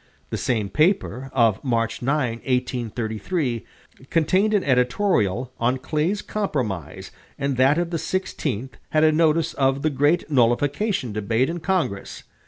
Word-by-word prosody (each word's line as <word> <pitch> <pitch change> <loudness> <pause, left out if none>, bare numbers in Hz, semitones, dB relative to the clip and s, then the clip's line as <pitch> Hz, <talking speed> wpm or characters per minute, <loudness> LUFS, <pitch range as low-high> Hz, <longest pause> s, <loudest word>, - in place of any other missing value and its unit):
The - - -1
same 110 -5 0
paper, 150 - +1
of 115 -5 +2
March 115 -3 -1
9, 130 -3 0
1833, 120 - -2 0.5
contained 190 +6 +2
an 200 - +2
editorial 125 - +1
on 125 +3 +1
Clay's 155 +9 -1
compromise 95 - -3 0.3
and 140 -1 -1
that 135 +4 +4
of 175 0 -1
the 170 - 0
16th 140 - -3 0.2
had 155 0 +2
a 155 - +6
notice 160 +1 +2
of 135 0 +1
the 155 - +2
great 145 +5 +2
nullification 140 - +1
debate 115 +7 0
in 175 - -4
Congress. 165 - -2
135 Hz, 135 wpm, -23 LUFS, 115-160 Hz, 0.5 s, a